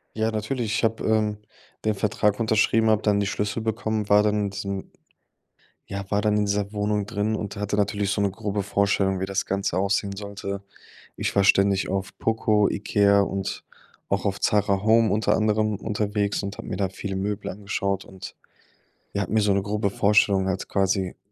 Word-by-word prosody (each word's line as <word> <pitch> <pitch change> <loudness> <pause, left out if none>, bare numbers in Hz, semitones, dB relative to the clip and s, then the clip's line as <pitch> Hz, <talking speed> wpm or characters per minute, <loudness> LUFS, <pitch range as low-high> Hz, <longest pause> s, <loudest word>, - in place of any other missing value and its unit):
Ja, 110 +1 0
natürlich, 110 +1 -2
ich - - -1
habe, 115 0 0
ähm, 110 -1 +1 0.5
den 110 - +2
Vertrag 105 +1 0
unterschrieben, 110 0 +3
habe 110 0 +3
dann 105 -1 +3
die 100 - 0
Schlüssel 105 +2 -2
bekommen, 110 -1 -2
war 105 0 +6
dann 105 0 +2
in - - -2
diesem 100 0 -5 1.0
ja, 100 0 -4
war 100 - +1
dann 105 -1 +2
in 105 0 +2
dieser 100 +1 -1
Wohnung 105 0 0
drin 105 +2 -1
und 105 -1 -5
hatte 105 0 -2
natürlich 100 -1 0
so 100 - 0
'ne 100 -1 +1
grobe 100 0 -3
Vorstellung, 100 -1 +1
wie 95 - -2
das 100 0 -1
Ganze 100 -1 -1
aussehen 100 0 0
sollte. 100 -1 -6 0.5
Ich - - -2
war 100 - +4
ständig 100 -1 +3
auf 95 0 -3
Poco, 110 -2 +2
Ikea 100 0 +3
und 95 -1 -3 0.5
auch 100 +1 0
auf 100 -1 -1
Zara 100 -2 +2
Home 110 +1 +4
unter 110 +1 +2
anderem 110 0 +1
unterwegs 105 0 -1
und 100 0 -5
habe - - -8
mir 90 - -3
da 95 -2 0
viele 95 0 -5
Möbel 100 +1 -3
angeschaut. 100 0 -2
Und, 95 -1 -10 0.8
ja, 100 - -1
habe 95 - -6
mir 110 - +4
so 105 -1 +2
eine 100 0 +2
grobe 105 0 -1
Vorstellung 100 -1 +3
halt 95 0 -3
quasi 95 -2 0
100 Hz, 190 wpm, -24 LUFS, 100-105 Hz, 1.0 s, war